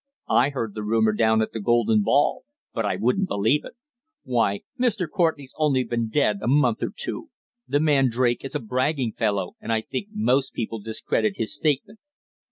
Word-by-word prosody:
I 125 Hz, +4 st, +4 dB
heard 115 Hz, -7 st, -4 dB
the 105 Hz, -, -5 dB
rumour 110 Hz, 0 st, +2 dB
down 110 Hz, 0 st, +3 dB
at -, -, -5 dB
the 115 Hz, -, -3 dB
Golden 115 Hz, 0 st, +3 dB
Ball, 140 Hz, +8 st, +2 dB, 0.3 s
but 115 Hz, -3 st, -1 dB
I 95 Hz, -, 0 dB
wouldn't 125 Hz, -, +1 dB
believe 110 Hz, -, +1 dB
it. -, -, -10 dB, 0.5 s
Why, 115 Hz, -5 st, 0 dB, 0.2 s
Mr. 220 Hz, -8 st, +1 dB
Courtenay's 155 Hz, -5 st, -1 dB
only 140 Hz, -4 st, +2 dB
been 115 Hz, -1 st, -2 dB
dead 110 Hz, -6 st, +1 dB
a 110 Hz, -, -3 dB
month 145 Hz, +4 st, +3 dB
or -, -, -1 dB
two. 480 Hz, -9 st, -4 dB, 0.4 s
The 145 Hz, -, +1 dB
man 145 Hz, -4 st, +3 dB
Drake 120 Hz, 0 st, 0 dB
is 135 Hz, -, -7 dB
a -, -, +1 dB
bragging 130 Hz, +1 st, -1 dB
fellow, 100 Hz, -5 st, -1 dB
and -, -, -4 dB
I 110 Hz, -1 st, +2 dB
think 200 Hz, -, -5 dB
most 140 Hz, -, +1 dB
people 115 Hz, -1 st, -4 dB
discredit 110 Hz, -1 st, -1 dB
his 115 Hz, +5 st, -1 dB
statement." 155 Hz, +9 st, -1 dB
120 Hz, 185 wpm, -24 LUFS, 110-145 Hz, 0.5 s, I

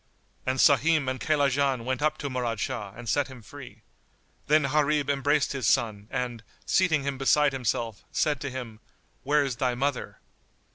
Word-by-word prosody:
And 130 Hz, +1 st, 0 dB
Sahim 150 Hz, +1 st, +4 dB
and 130 Hz, 0 st, -2 dB
Kaylajan 140 Hz, -3 st, +1 dB
went 130 Hz, +1 st, -2 dB
up 155 Hz, 0 st, +1 dB
to 140 Hz, -, -4 dB
Murad 120 Hz, -4 st, -2 dB
Shah 110 Hz, -6 st, -3 dB
and 120 Hz, 0 st, -9 dB
set 145 Hz, +4 st, +1 dB
him 130 Hz, -4 st, -12 dB
free. 115 Hz, -3 st, -12 dB, 0.6 s
Then 155 Hz, +1 st, +4 dB
Gharib 145 Hz, 0 st, +1 dB
embraced 145 Hz, +1 st, +1 dB
his 130 Hz, -6 st, -2 dB
son 105 Hz, -1 st, +1 dB
and, 125 Hz, -3 st, -3 dB, 0.2 s
seating 160 Hz, -6 st, +2 dB
him 140 Hz, -1 st, -3 dB
beside 145 Hz, +1 st, +3 dB
himself, 115 Hz, -3 st, -2 dB
said 150 Hz, -3 st, 0 dB
to 140 Hz, -, -3 dB
him, 120 Hz, -4 st, -7 dB, 0.4 s
"Where 145 Hz, +1 st, +2 dB
is 130 Hz, -3 st, -3 dB
thy 125 Hz, -2 st, 0 dB
mother?" 135 Hz, +1 st, -2 dB
135 Hz, 170 wpm, -27 LUFS, 120-145 Hz, 0.6 s, Sahim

